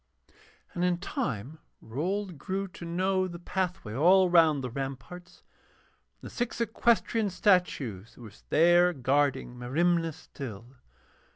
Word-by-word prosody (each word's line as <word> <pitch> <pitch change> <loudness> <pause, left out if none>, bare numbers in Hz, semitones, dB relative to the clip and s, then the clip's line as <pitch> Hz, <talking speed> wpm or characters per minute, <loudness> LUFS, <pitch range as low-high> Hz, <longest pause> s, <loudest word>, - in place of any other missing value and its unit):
And 175 - -2
in 180 -1 +2
time 155 - -4 0.2
Rold 180 - -4
grew 195 +6 -3
to 175 - -10
know 185 +2 0
the 175 -1 -8
pathway 180 - -3
all 180 +7 +4
round 160 -5 +4
the 125 - -4
ramparts, 135 +7 -7 0.8
and - - -10
the - - -17
six 240 -1 -3
equestrian 230 -1 +1
statues 160 - 0
that - - -15
were 110 -3 -10 0.2
there 175 +3 +5
guarding 135 -2 0
Merimna 165 +6 +1
still. 125 -5 -10
170 Hz, 125 wpm, -28 LUFS, 135-185 Hz, 0.8 s, there